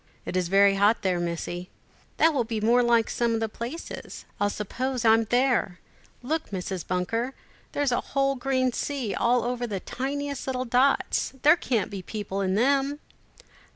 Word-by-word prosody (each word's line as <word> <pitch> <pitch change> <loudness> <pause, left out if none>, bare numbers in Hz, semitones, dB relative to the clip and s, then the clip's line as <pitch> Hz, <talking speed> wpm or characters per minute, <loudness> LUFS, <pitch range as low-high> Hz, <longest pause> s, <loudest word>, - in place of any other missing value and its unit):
"It - - -4
is 180 -2 +1
very 195 +1 +5
hot 205 +3 +3
there, 185 -2 +1
Missie." 175 +1 -4 0.5
"That 325 0 +4
will 265 -4 +1
be 225 -1 -3
more 235 +3 +4
like 235 -2 +3
some 235 -1 0
of - - 0
the 225 - 0
places. 235 +9 -7
I'll 205 - +2
suppose 245 +5 -3
I'm 225 0 +5
there! 245 -6 +1 0.4
Look, 315 +5 -2
Mrs. 185 -2 -4
Bunker, 225 +8 -1 0.4
here's 285 -2 0
a 245 - +1
whole 275 0 0
green 260 -1 0
sea, 265 -7 -2
all 240 0 +2
over 245 0 -2
the 200 -4 -3
tiniest 280 +5 -4
little 255 -1 -1
dots. 255 +4 +2
There 300 +3 +7
can't 240 - -1
be 195 -2 -5
people 200 0 -4
in 190 -1 0
them." 275 +5 +2
235 Hz, 170 wpm, -26 LUFS, 200-265 Hz, 0.5 s, There